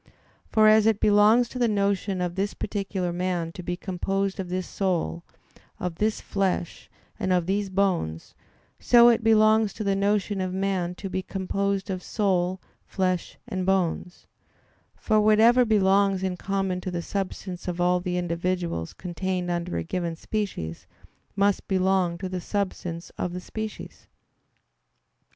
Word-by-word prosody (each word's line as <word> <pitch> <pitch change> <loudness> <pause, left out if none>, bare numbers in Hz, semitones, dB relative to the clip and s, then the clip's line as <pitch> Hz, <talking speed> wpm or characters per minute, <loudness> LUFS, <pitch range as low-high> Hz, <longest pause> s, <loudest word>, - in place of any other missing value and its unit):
For 215 -1 +5
as 215 0 +6
it 220 -2 +3
belongs 210 +4 +5
to 250 - -6
the 240 - +3
notion 200 -2 0
of 175 -1 -1
this 195 +2 -2
particular 195 -3 -3
man 175 -2 -2
to 180 - -8
be 175 0 -3
composed 195 +1 -2
of 185 -2 -4
this 185 0 -2
soul, 175 -3 -1 0.6
of 180 -2 -4
this 215 0 0
flesh, 190 -4 -2 0.3
and 190 -3 -1
of 180 -2 +2
these 195 +2 -1
bones; 185 - -1 0.5
so 240 -1 +7
it 230 -1 +2
belongs 220 -1 +4
to 220 - -5
the 200 -1 +1
notion 200 0 0
of 185 0 -2
man 190 -2 -1
to 195 - -6
be 190 0 -2
composed 195 +1 -2
of 185 -1 -3
soul, 185 -3 0 0.3
flesh, 185 -2 -1
and 185 -1 -3
bones; 185 -1 -1 0.7
for 215 -1 +2
whatever 225 +4 +5
belongs 195 -2 +3
in 185 -1 -1
common 195 0 -2
to 185 - -4
the 175 -1 -3
substance 185 -2 -5
of 175 -1 -3
all 180 0 +3
the 180 0 -2
individuals 175 - -2
contained 180 0 -3
under 175 0 -2
a - - -2
given 170 -1 -3
species, 165 - -4 0.5
must 200 0 +1
belong 185 -2 +1
to 190 +2 -4
the 185 -1 -4
substance 180 -4 -3
of 180 - -2
the 180 - -4
species. 220 +3 -7
190 Hz, 155 wpm, -26 LUFS, 180-200 Hz, 0.7 s, so